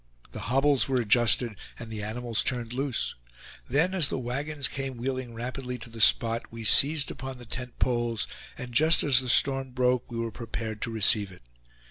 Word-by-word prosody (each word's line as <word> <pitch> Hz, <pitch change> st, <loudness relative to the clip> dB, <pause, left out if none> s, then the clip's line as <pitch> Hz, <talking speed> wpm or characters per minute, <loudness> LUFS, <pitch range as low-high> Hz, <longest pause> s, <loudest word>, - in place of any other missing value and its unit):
The -, -, -8 dB
hobbles 135 Hz, 0 st, +2 dB
were 130 Hz, -1 st, +1 dB
adjusted, 115 Hz, -1 st, +2 dB, 0.2 s
and 115 Hz, -1 st, -9 dB
the 110 Hz, -1 st, -6 dB
animals 115 Hz, +2 st, -3 dB
turned 120 Hz, -2 st, -3 dB
loose; 135 Hz, -1 st, -2 dB, 0.6 s
then, 155 Hz, +9 st, +1 dB
as 175 Hz, -7 st, +3 dB
the -, -, -3 dB
wagons 140 Hz, +3 st, -3 dB
came 135 Hz, -3 st, -5 dB
wheeling 130 Hz, -1 st, -5 dB
rapidly 125 Hz, +2 st, -6 dB
to 120 Hz, -, -11 dB
the 115 Hz, -1 st, -5 dB
spot, 115 Hz, +2 st, +4 dB
we 115 Hz, 0 st, -8 dB
seized 145 Hz, +7 st, +6 dB
upon 130 Hz, -1 st, -8 dB
the 120 Hz, -, -13 dB
tent 125 Hz, +1 st, -6 dB
poles, 120 Hz, -3 st, -1 dB, 0.3 s
and 125 Hz, -1 st, -8 dB
just 160 Hz, +6 st, +4 dB
as 135 Hz, -4 st, +4 dB
the 130 Hz, -1 st, -4 dB
storm 135 Hz, 0 st, +3 dB
broke, 125 Hz, -1 st, 0 dB
we 115 Hz, -, -6 dB
were 115 Hz, 0 st, -3 dB
prepared 110 Hz, -1 st, -7 dB
to 120 Hz, -, -2 dB
receive 105 Hz, -2 st, +3 dB
it. 90 Hz, -, -17 dB
125 Hz, 185 wpm, -26 LUFS, 115-135 Hz, 0.6 s, seized